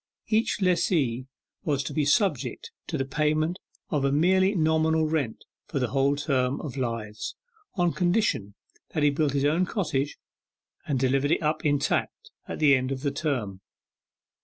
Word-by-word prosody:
Each 220 -2 +1
lessee 150 -9 +1 0.4
was 140 -3 0
to - - -5
be 150 -2 +1
subject 210 - 0 0.2
to 160 - -2
the 135 - -1
payment 155 +5 0 0.3
of 145 -3 +1
a 140 - +2
merely 185 +6 +3
nominal 160 -1 +2
rent 150 -8 -2 0.2
for - - -4
the 125 -3 0
whole 135 +3 +2
term 135 -2 0
of 140 -4 -6
lives, 115 -5 -4 0.4
on 175 -3 +2
condition 175 - 0 0.4
that 155 - +1
he 145 - +5
built 145 -1 0
his 140 0 +1
own 165 +5 +2
cottage, 150 -9 -1 0.7
and 140 - 0
delivered 135 +2 +2
it 165 - +1
up 155 +1 0
intact 145 -2 0 0.2
at - - -5
the 150 -3 +5
end 130 0 -1
of 130 -1 -3
the 140 -1 0
term. 125 - -2
145 Hz, 160 wpm, -26 LUFS, 135-160 Hz, 0.7 s, he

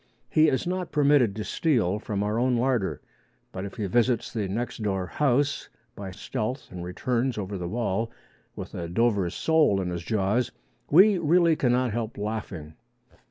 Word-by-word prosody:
He 155 0 +5
is 130 -4 +1
not 180 0 -3
permitted 140 -8 +3
to 105 - -3
steal 105 - +1
from 105 -2 -3
our 105 +2 0
own 125 0 +2
larder. 120 -5 0 0.5
But 95 - -5
if 100 - -8
he 105 - -3
visits 120 +3 +1
the 105 -4 -1
next 115 +4 -4
door 95 -3 -1
house 140 +5 0 0.3
by 100 -1 -6
stealth 110 +7 -4
and 90 -1 -6
returns 120 +7 -1
over 100 -1 -4
the 90 -2 -4
wall 115 0 -1 0.5
with - - -8
a 85 -1 -5
Dover 100 -2 +1
sole 155 - +2
in 90 -2 -2
his 85 -1 -3
jaws, 110 +5 0 0.4
we 190 +5 +6
really 170 +1 +4
cannot 125 -3 +1
help 115 +1 -3
laughing. 100 -7 -5
115 Hz, 165 wpm, -26 LUFS, 95-130 Hz, 0.5 s, we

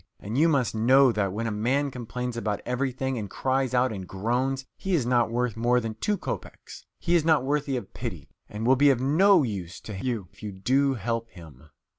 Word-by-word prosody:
And 105 +3 -6
you 160 +5 +4
must 140 -6 +1
know 130 +4 +5
that 100 -4 -1
when 110 +4 -3
a 115 - -1
man 130 +7 0
complains 125 0 -5
about 105 -3 -2
everything, 130 0 -2
and 105 -2 -5
cries 130 +2 0
out 125 +1 +3
and 95 -3 -7
groans 125 +7 -1
he 190 -1 -1
is 140 -8 +1
not 120 -2 +2
worth 120 -1 -1
more 120 +2 +2
than 115 -2 -4
two 205 - -1
kopeks, - - -7
he 175 - -1
is 170 -3 +4
not 160 -4 +3
worthy 140 -1 0
of 100 -6 -8
pity, - - -6 0.2
and 105 +2 -5
will 130 +2 +5
be 145 +2 +5
of 130 -4 +3
no 165 +7 +4
use 95 -7 -5
to 110 - -8
you 115 -7 -2
if - - -19
you 105 -2 -5
do 130 +8 +1
help 115 +1 -3
him." 80 - -14
125 Hz, 215 wpm, -26 LUFS, 110-135 Hz, 0.2 s, know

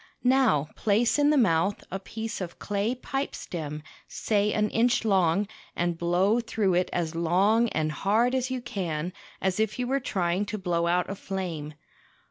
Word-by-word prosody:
Now 250 - +3
place 225 +6 +2
in 290 0 +4
the 300 - +4
mouth 195 -4 +2
a 195 - -3
piece 220 +2 -5
of 175 -2 -6
clay 205 +4 -1
pipe 270 +2 -3
stem, 150 -3 -6 0.2
say 210 -1 0
an 210 0 +1
inch 235 0 +2
long, 195 -1 +3 0.3
and 175 0 0
blow 180 +6 +2
through 220 -5 0
it 180 +1 +1
as 170 -2 -1
long 195 +8 +3
and 155 -4 -1
hard 220 +9 +2
as 260 0 0
you 255 -1 -3
can, 180 -7 -3 0.3
as 190 +2 +1
if 220 -1 0
you 250 - -1
were 270 +2 +1
trying 190 -5 -1
to 215 - -3
blow 175 -3 0
out 180 +1 +2
a - - -3
flame. 175 -7 -5
195 Hz, 175 wpm, -27 LUFS, 175-225 Hz, 0.3 s, in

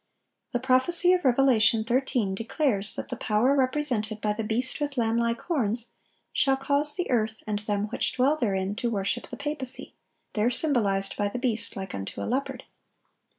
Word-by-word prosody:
The 245 - -2
prophecy 265 +8 +7
of 360 - -1
Revelation 240 -4 +3
13 240 -4 -1
declares 220 -1 0
that - - -7
the 250 - -4
power 225 +4 0
represented 255 -6 0
by 210 0 -2
the 220 +1 -5
beast 240 +6 -1
with 290 -2 -4
lamb 225 -1 0
like 235 0 -1
horns 240 - -2 0.4
shall 270 -1 +1
cause 285 +2 +2
"the 360 -6 -4
earth 220 -2 -2
and 210 -1 -3
them 205 -1 -3
which - - -2
dwell 265 +4 +1
therein" 195 -7 -2
to 235 - -2
worship 210 +2 -3
the - - -9
papacy—there 265 -5 -3
symbolized 220 -8 0
by 205 - -1
the 200 - -6
beast 240 -3 +1
"like 190 -1 -7
unto 95 0 -7
a - - -4
leopard." 265 +4 -4
240 Hz, 170 wpm, -25 LUFS, 215-270 Hz, 0.4 s, prophecy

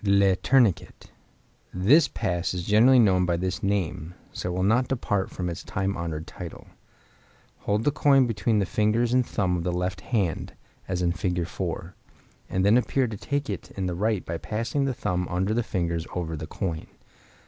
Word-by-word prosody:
Le 100 -2 +4
Tourniquet.—This 120 - +1
pass 90 0 -2
is 90 -1 -4
generally 115 +5 +6
known 95 -6 +4
by 85 -1 +1
this 95 +2 -2
name, 90 -4 -2 0.2
so - - -4
I - - -3
will 95 - 0
not 120 +6 +3
depart 105 -7 -1
from 90 - -4
its 85 -2 -5
time 95 +1 -2
honored 80 -2 -4
title. 85 -2 -9 1.0
Hold 105 +2 +1
the 145 - +3
coin 140 -3 +4
between 115 -1 0
the 100 - +2
fingers 110 +5 +1
and 125 0 +4
thumb 95 -6 -1
of 85 - -3
the 90 - -1
left 90 +1 -2
hand 100 -9 -1 0.3
(as 90 -1 -1
in 85 - +2
Fig. 90 0 -1
4), - - -5 0.6
and 95 +1 0
then 105 +4 +6
appear 130 +1 0
to 110 - -5
take 140 +7 -2
it - - -5
in 95 - -1
the 90 - -1
right 105 +2 0
by 85 0 -4
passing 115 +6 -2
the 135 - 0
thumb 90 -4 -1
under 95 +4 0
and 110 - 0
the - - +1
fingers 85 -5 -2
over 85 -2 -3
the 80 0 -6
coin. 80 -2 -4
95 Hz, 190 wpm, -26 LUFS, 90-115 Hz, 1.0 s, generally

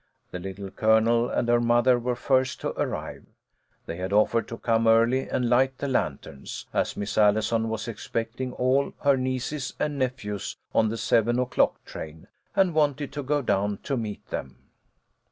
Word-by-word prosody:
The 90 - -5
Little 95 +1 -7
Colonel 115 +3 +3
and 120 - 0
her 120 0 +4
mother 120 +1 +4
were 125 +1 -1
first 130 +1 +1
to - - -1
arrive. - - -4 0.6
They 85 - -5
had 95 +1 -4
offered 110 +2 +3
to 115 - -6
come 115 -1 +1
early 115 +4 +3
and 125 - 0
light 130 +2 +3
the 140 - -3
lanterns, 70 - -3
as - - 0
Miss 105 +1 -2
Allison 110 +2 +3
was 110 +1 -3
expecting 115 +2 -4
all 130 +2 +1
her 140 -1 +4
nieces 130 +2 -3
and 145 -1 -2
nephews 105 -6 -3 0.2
on 110 -1 +3
the 115 - -3
seven 115 +1 +2
o'clock 125 0 +1
train, 80 0 -9 0.3
and 190 -3 +3
wanted 145 -2 +1
to 145 - -3
go 145 +1 0
down 100 -2 0
to 140 - -1
meet 110 -4 -5
them. 65 -1 -7
120 Hz, 170 wpm, -26 LUFS, 110-130 Hz, 0.6 s, her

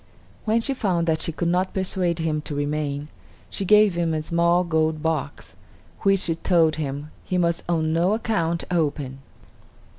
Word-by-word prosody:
When 225 +1 +2
she 275 +4 +2
found 185 -9 0
that 160 -1 0
she - - 0
could 170 +2 -2
not 180 +2 0
persuade 185 -3 0
him 160 -2 -1
to 145 - -4
remain, 145 0 -2 0.4
she 195 - -3
gave 210 0 +5
him 170 -2 0
a 155 - -2
small 170 +2 +2
gold 160 -2 0
box, 150 -3 -3 0.5
which, 195 -1 +3
she 165 - +1
told 160 -2 +2
him, 145 0 -4
he 185 - -2
must 170 -1 +1
on 160 -2 +1
no 175 +5 +2
account 170 -7 -1
open. 145 -5 -1
165 Hz, 170 wpm, -23 LUFS, 155-180 Hz, 0.5 s, gave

